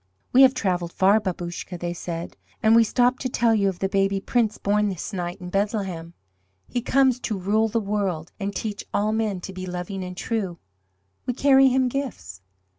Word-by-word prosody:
"We 260 Hz, -, +7 dB
have 260 Hz, -1 st, +7 dB
travelled 180 Hz, -6 st, -1 dB
far, 195 Hz, +3 st, +4 dB
Babouscka," 175 Hz, -2 st, -5 dB
they 175 Hz, 0 st, -3 dB
said, 170 Hz, -1 st, -6 dB, 0.3 s
"and 220 Hz, +1 st, +6 dB
we 230 Hz, -, +7 dB
stop 245 Hz, +3 st, +2 dB
to 255 Hz, -, -2 dB
tell 235 Hz, -1 st, +2 dB
you 200 Hz, -3 st, +2 dB
of 185 Hz, -, -5 dB
the 195 Hz, -, -1 dB
Baby 195 Hz, 0 st, +1 dB
Prince 220 Hz, +1 st, 0 dB
born 210 Hz, +1 st, +1 dB
this 185 Hz, 0 st, -5 dB
night 175 Hz, -2 st, -4 dB
in 180 Hz, -1 st, -8 dB
Bethlehem. 195 Hz, -5 st, -2 dB, 0.5 s
He 245 Hz, -, -2 dB
comes 260 Hz, 0 st, +3 dB
to 215 Hz, -4 st, -3 dB
rule 210 Hz, +4 st, +1 dB
the 225 Hz, +1 st, 0 dB
world 195 Hz, -6 st, -2 dB
and 200 Hz, 0 st, -2 dB
teach 210 Hz, -1 st, -4 dB
all 210 Hz, +1 st, +1 dB
men 215 Hz, -4 st, -1 dB
to 190 Hz, -, -7 dB
be 185 Hz, 0 st, -6 dB
loving 180 Hz, +2 st, -4 dB
and 180 Hz, 0 st, -7 dB
true. 195 Hz, -7 st, -2 dB, 0.7 s
We 250 Hz, -, -1 dB
carry 270 Hz, 0 st, +5 dB
Him 260 Hz, 0 st, +3 dB
gifts. 245 Hz, -, -5 dB
200 Hz, 190 wpm, -24 LUFS, 180-230 Hz, 0.7 s, We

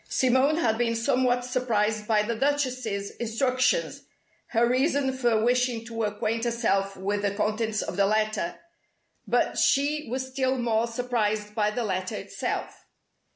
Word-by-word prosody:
Simone 260 Hz, +4 st, +3 dB
had 225 Hz, -8 st, +1 dB
been 230 Hz, -1 st, +1 dB
somewhat 245 Hz, 0 st, +1 dB
surprised 220 Hz, -4 st, 0 dB
by 215 Hz, -2 st, +3 dB
the 235 Hz, +2 st, -2 dB
Duchess's 255 Hz, -6 st, -1 dB
instructions 255 Hz, -, 0 dB, 0.5 s
(her 235 Hz, +1 st, +2 dB
reason 265 Hz, +2 st, +1 dB
for 240 Hz, -4 st, +1 dB
wishing 245 Hz, -2 st, +1 dB
to 230 Hz, -1 st, -5 dB
acquaint 215 Hz, +2 st, -2 dB
herself 210 Hz, -5 st, 0 dB
with 200 Hz, +2 st, -1 dB
the 200 Hz, -1 st, -1 dB
contents 215 Hz, +1 st, -1 dB
of -, -, -5 dB
the 200 Hz, -1 st, +4 dB
letter) 215 Hz, -4 st, 0 dB, 0.7 s
but -, -, +1 dB
she 295 Hz, +1 st, +2 dB
was 260 Hz, +2 st, -2 dB
still 260 Hz, 0 st, 0 dB
more 230 Hz, -1 st, +1 dB
surprised 220 Hz, -3 st, -1 dB
by 210 Hz, -1 st, +1 dB
the 235 Hz, +3 st, -2 dB
letter 185 Hz, -3 st, -2 dB
itself. -, -, -5 dB
235 Hz, 145 wpm, -26 LUFS, 215-255 Hz, 0.7 s, the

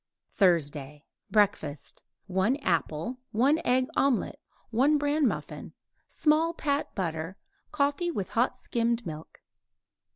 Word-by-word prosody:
THURSDAY 150 Hz, -6 st, +1 dB, 0.2 s
BREAKFAST 195 Hz, -9 st, 0 dB, 0.2 s
1 190 Hz, +7 st, +1 dB
apple; 170 Hz, +7 st, -1 dB
1 270 Hz, +8 st, +3 dB
egg 255 Hz, +1 st, +3 dB
omelet; 275 Hz, -4 st, +1 dB, 0.3 s
1 275 Hz, +7 st, +4 dB
bran 290 Hz, 0 st, +2 dB
muffin; -, -, -5 dB, 0.3 s
small 320 Hz, +2 st, +2 dB
pat 285 Hz, -2 st, -1 dB
butter; 165 Hz, 0 st, -3 dB, 0.3 s
coffee 290 Hz, +3 st, +1 dB
with 200 Hz, -, -3 dB
hot 240 Hz, +3 st, +1 dB
skimmed 235 Hz, 0 st, -1 dB
milk. 155 Hz, -1 st, -8 dB
230 Hz, 105 wpm, -28 LUFS, 170-285 Hz, 0.3 s, 1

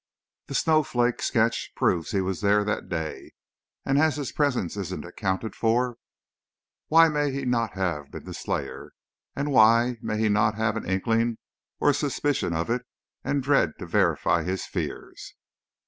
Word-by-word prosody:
That 140 Hz, -, -5 dB
snowflake 130 Hz, -7 st, +2 dB
sketch 115 Hz, +1 st, 0 dB
proves 85 Hz, -3 st, +1 dB
he 100 Hz, -3 st, 0 dB
was 95 Hz, 0 st, -3 dB
there 105 Hz, 0 st, +3 dB
that 105 Hz, +1 st, -3 dB
day 80 Hz, -3 st, -5 dB, 0.5 s
and 135 Hz, +1 st, +2 dB
as 155 Hz, -2 st, +3 dB
his 145 Hz, -4 st, -4 dB
presence 125 Hz, -, 0 dB
isn't 100 Hz, -4 st, -5 dB
accounted 95 Hz, +4 st, -3 dB
for, 120 Hz, +1 st, +1 dB, 0.9 s
why 165 Hz, +1 st, +7 dB
may 150 Hz, -2 st, 0 dB
he 135 Hz, 0 st, -4 dB
not 115 Hz, -3 st, 0 dB
have 85 Hz, -7 st, -2 dB
been -, -, -9 dB
the -, -, -8 dB
slayer? -, -, -4 dB, 0.4 s
And, 145 Hz, +1 st, -2 dB
why 115 Hz, 0 st, +5 dB
may 105 Hz, -, -2 dB
he 110 Hz, 0 st, +2 dB
not 105 Hz, +1 st, +2 dB
have 110 Hz, 0 st, 0 dB
an 115 Hz, -, -4 dB
inkling 115 Hz, +4 st, +1 dB, 0.4 s
or 145 Hz, -, +4 dB
a -, -, -1 dB
suspicion 145 Hz, -, -1 dB
of 80 Hz, 0 st, -1 dB
it, 120 Hz, +1 st, 0 dB, 0.4 s
and 140 Hz, -1 st, -1 dB
dread 135 Hz, -, +3 dB
to -, -, -7 dB
verify -, -, +2 dB
his 95 Hz, 0 st, -3 dB
fears?" -, -, -6 dB
115 Hz, 165 wpm, -26 LUFS, 100-140 Hz, 0.9 s, why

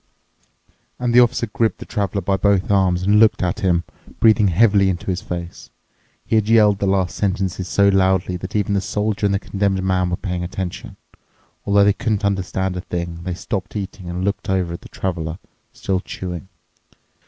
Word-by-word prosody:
And 120 Hz, -1 st, -1 dB
the 120 Hz, -, +7 dB
officer 120 Hz, -1 st, +3 dB
gripped 110 Hz, -1 st, -1 dB
the -, -, -9 dB
traveler 100 Hz, -3 st, -2 dB
by 95 Hz, +2 st, +1 dB
both 100 Hz, 0 st, +1 dB
arms 90 Hz, -2 st, +2 dB
and 105 Hz, +2 st, +4 dB
looked 110 Hz, -3 st, +4 dB
at 90 Hz, -1 st, -1 dB
him, 85 Hz, -3 st, +1 dB, 0.4 s
breathing 110 Hz, -2 st, +5 dB
heavily 100 Hz, +1 st, +4 dB
into 85 Hz, -3 st, -3 dB
his 90 Hz, 0 st, -3 dB
face. 85 Hz, -1 st, -7 dB, 0.6 s
He -, -, 0 dB
had 110 Hz, 0 st, 0 dB
yelled 105 Hz, -3 st, +5 dB
the 100 Hz, -, 0 dB
last 95 Hz, -2 st, +1 dB
sentences 95 Hz, -2 st, -1 dB
so 100 Hz, +2 st, +3 dB
loudly 95 Hz, -2 st, +2 dB
that 95 Hz, +3 st, -8 dB
even 105 Hz, -1 st, +1 dB
the 100 Hz, -, +1 dB
Soldier 105 Hz, +2 st, -1 dB
and 100 Hz, -, +1 dB
the -, -, +2 dB
Condemned 100 Hz, -1 st, -1 dB
Man 95 Hz, -1 st, +1 dB
were 90 Hz, -, 0 dB
paying 90 Hz, -3 st, -3 dB
attention. 90 Hz, 0 st, -6 dB, 0.7 s
Although 100 Hz, 0 st, +5 dB
they 100 Hz, 0 st, +4 dB
couldn't 105 Hz, -1 st, -1 dB
understand 95 Hz, -1 st, -1 dB
a 90 Hz, -, -3 dB
thing, 85 Hz, -1 st, -5 dB
they 90 Hz, -2 st, -2 dB
stopped 100 Hz, +1 st, -5 dB
eating 95 Hz, -3 st, -6 dB
and 90 Hz, +2 st, -3 dB
looked 100 Hz, -1 st, -2 dB
over 90 Hz, -3 st, 0 dB
at 85 Hz, -, -7 dB
the -, -, -13 dB
Traveler, 85 Hz, -3 st, -3 dB, 0.3 s
still 95 Hz, -1 st, -2 dB
chewing. 90 Hz, -1 st, -6 dB
95 Hz, 190 wpm, -20 LUFS, 90-100 Hz, 0.7 s, the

